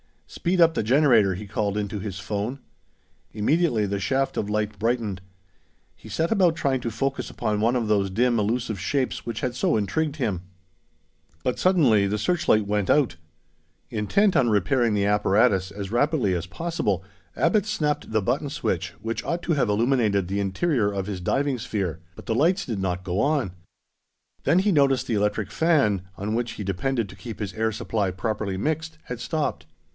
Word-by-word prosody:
"Speed 175 +1 -1
up 165 -1 +6
the - - 0
generator," 115 -5 +4
he 105 - -7
called 105 0 -2
into 105 0 -3
his 95 -1 -5
phone. 105 +7 -3 0.7
Immediately 115 0 +2
the 100 0 -2
shaft 135 +6 0
of 105 - -2
light 105 -1 -2
brightened. 110 -4 -1 0.7
He - - -14
set 165 +1 -1
about 185 -6 +4
trying 140 -5 0
to 120 - -2
focus 135 +5 -2
upon 105 -1 -2
one 115 +4 +2
of 120 -3 0
those 100 -2 +2
dim 120 +4 +2
elusive 110 0 -1
shapes 130 +7 -1
which 115 -1 -3
had 125 -1 -1
so 180 +6 +1
intrigued 140 +9 -1
him. 105 - -1 1.0
But 125 - -1
suddenly 135 - +4
the 105 +2 -1
searchlight 110 - +2
went 105 -1 -1
out! 145 - +3 0.7
Intent 155 - +2
on 120 - +4
repairing 110 +3 +2
the 100 -1 +1
apparatus 100 -2 +3
as 100 -1 -6
rapidly 125 - +2
as 85 0 -2
possible, 100 - -2 0.3
Abbot 195 +4 +2
snapped 155 - -1
the 110 -1 +2
button 135 +8 -1
switch, - - -2
which 115 +1 -3
ought 170 +1 -2
to 170 - +1
have 135 -7 +1
illuminated 105 -4 +2
the 100 +1 -1
interior 105 - +1
of 100 -1 -3
his 100 -3 -4
diving 135 +7 0
sphere; 100 -8 -3 0.2
but - - -12
the 115 - 0
lights 170 - +2
did 110 -5 -3
not 90 -1 -2
go 90 +1 -2
on. 140 -8 +1 0.9
Then 175 - +4
he 200 +2 +2
noticed 135 -5 +3
that 120 - -2
the 105 - +2
electric 105 0 -1
fan, 140 - +2
on 105 +4 -3
which 120 +1 -1
he 105 - -6
depended 105 +5 -1
to 95 - -11
keep 110 +3 -8
his 100 -3 -4
air 110 +1 0
supply 110 -2 -1
properly 100 0 -3
mixed, 160 +7 -2
had 125 -2 -6
stopped. 135 - -2
110 Hz, 180 wpm, -25 LUFS, 100-140 Hz, 1.0 s, up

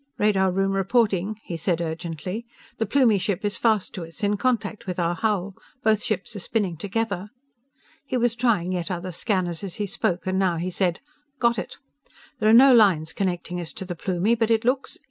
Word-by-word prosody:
"Radar 195 -2 +3
room 195 +1 +1
reporting," 200 0 +1
he 170 - -5
said 165 +1 0
urgently. 170 +5 -4 0.4
"The 225 - 0
Plumie 230 -4 +4
ship 200 +1 -2
is 205 - 0
fast 220 -4 +1
to 180 - -5
us, 165 +6 -9
in 205 0 +2
contact 215 -3 -1
with 180 - -3
our 170 -1 +1
hull! 200 -1 -1 0.3
Both 215 -1 +3
ships 215 +2 -3
are - - -4
spinning 195 -2 -1
together!" 200 +2 -3 0.8
He 255 - -1
was 240 -1 +2
trying 225 -7 +1
yet 180 -1 -2
other 185 0 -4
scanners 180 -1 -1
as 190 -3 -5
he 210 - -2
spoke, 180 -2 -2
and 190 0 0
now 185 -3 +2
he 180 +3 -3
said: 180 -1 0 0.4
"Got 235 -3 +2
it! 185 - -7 0.6
There 215 -2 +3
are 230 +4 +9
no 265 - +7
lines 185 -9 +4
connecting 180 -2 -2
us 165 - -6
to 190 - -5
the 180 - -4
Plumie, 185 +5 0
but 225 -1 +1
it 225 0 +2
looks 260 +2 0
195 Hz, 200 wpm, -24 LUFS, 175-220 Hz, 0.8 s, are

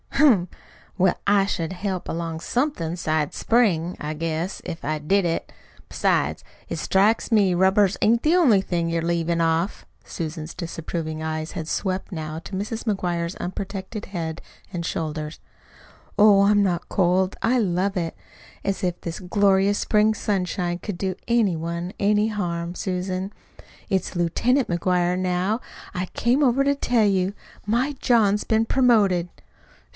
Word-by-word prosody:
"Humph! 235 - +4 0.5
Well, 185 0 +4
I 200 -1 +4
should 170 -3 -2
help 185 -1 -3
along 165 -1 -3
somethin' 240 - -1
'sides 155 -3 -1
spring, 185 -8 +2
I 150 +1 -3
guess, 165 +3 -3
if 165 - -6
I 155 +1 0
did 190 +6 +2
it. 165 -1 -2 0.4
Besides, - - 0 0.3
it - - -3
strikes 210 +5 +2
me 200 -5 +4
rubbers 190 +2 +3
ain't 230 +2 +4
the 315 +3 +4
only 255 - +5
thing 170 -3 -1
you're 165 0 0
leavin' 170 0 0
off." 165 +4 0 0.2
Susan's 160 -1 -5
disapproving 165 -2 -4
eyes 155 0 -3
had 160 - -5
swept 190 +2 -2
now 155 -2 -5
to 180 - -11
Mrs. 215 +4 -3
McGuire's 175 -4 -1
unprotected 195 +3 -5
head 165 -4 -4 0.3
and 170 -2 -3
shoulders. 155 -1 -4 0.8
"Oh, 205 -1 +7
I'm 205 +1 +4
not 175 -3 -1
cold. 185 0 +2
I 250 +3 +3
love 195 -1 0
it. 165 -2 -2 0.5
As 195 -1 -2
if 180 -1 -1
this 170 -1 -5
glorious 195 +1 +2
spring 215 0 +3
sunshine 180 -3 -1
could 200 -3 -5
do 190 -2 -1
any 230 -6 +2
one 170 +3 -4
any 210 +1 +3
harm! 175 -5 -3
Susan, 185 0 -3 0.6
it's 190 -1 -1
LIEUTENANT 235 - +1
McGuire, 180 0 +1
now! 185 +5 0 0.3
I 180 +1 -2
came 245 +9 +1
over 265 +1 +3
to 280 0 +2
tell 240 -5 +2
you. 190 -1 +1 0.3
My 240 +7 +1
John's 210 -4 +3
been 220 0 +2
promoted." 210 -9 +3
185 Hz, 150 wpm, -24 LUFS, 170-210 Hz, 0.8 s, Oh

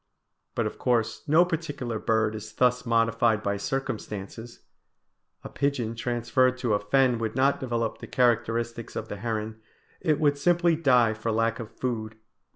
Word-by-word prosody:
But - - 0
of - - -5
course 120 -3 0
no 160 +4 +5
particular 145 -9 -3
bird 110 0 +1
is 110 0 -8
thus 125 -1 +1
modified 115 -1 +2
by 100 -1 0
circumstances. 115 -2 -5 0.8
A - - -6
pigeon 135 -5 -1
transferred 120 +2 +1
to 125 -4 0
a 105 - +2
fen 125 +3 +2
would 110 -1 -3
not 135 +2 +2
develop 115 -3 -2
the - - -9
characteristics 115 -1 0
of - - -5
the 100 - -5
heron; 110 0 -4 0.4
it 155 -2 +1
would 145 -2 +2
simply 175 +1 +3
die 125 -8 +4
for 110 +1 -3
lack 115 +1 0
of 115 -2 -6
food. 110 -4 -4
115 Hz, 160 wpm, -26 LUFS, 110-130 Hz, 0.8 s, no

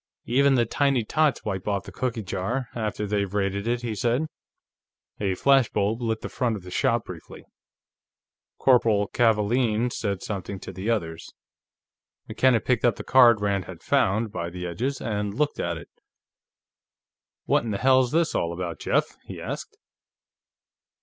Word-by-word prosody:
"Even 135 +3 +3
the 120 -2 +3
tiny 135 0 +1
tots 150 +3 +1
wipe 95 -3 -3
off 100 -2 0
the - - -10
cookie 120 -4 -3
jar, 100 +8 -3
after 105 -2 -3
they've 100 -1 -1
raided 100 +1 -1
it," 120 +1 -1
he 115 -2 -2
said. 120 +8 0 0.9
A 95 -3 0
flash 135 +2 +4
bulb 105 +3 -1
lit 115 -1 -1
the - - -4
front 120 -3 -1
of 100 - -8
the 90 - -10
shop 120 +1 +1
briefly. 85 -3 -10 1.1
Corporal 115 -6 +3
Kavaalen 115 +1 +2
said 100 -3 -3
something 100 -1 -5
to 95 - -8
the 95 +5 -4
others. 85 -8 -2 1.0
McKenna 130 -3 +3
picked 125 -3 0
up 120 - +3
the - - -7
card 120 -4 +6
Rand 100 -2 0
had - - -11
found 110 +3 +1
by 85 -3 -4
the 90 +1 -6
edges 125 +11 -2
and 105 -2 -2
looked 150 +3 0
at 85 -1 -1
it. - - -12 1.5
"What - - +2
in 115 - -3
hell's 130 +3 +3
this 165 0 +1
all 85 0 -1
about, 85 -1 -5
Jeff?" - - 0
he - - -8
asked. - - -6
110 Hz, 160 wpm, -25 LUFS, 100-125 Hz, 1.5 s, card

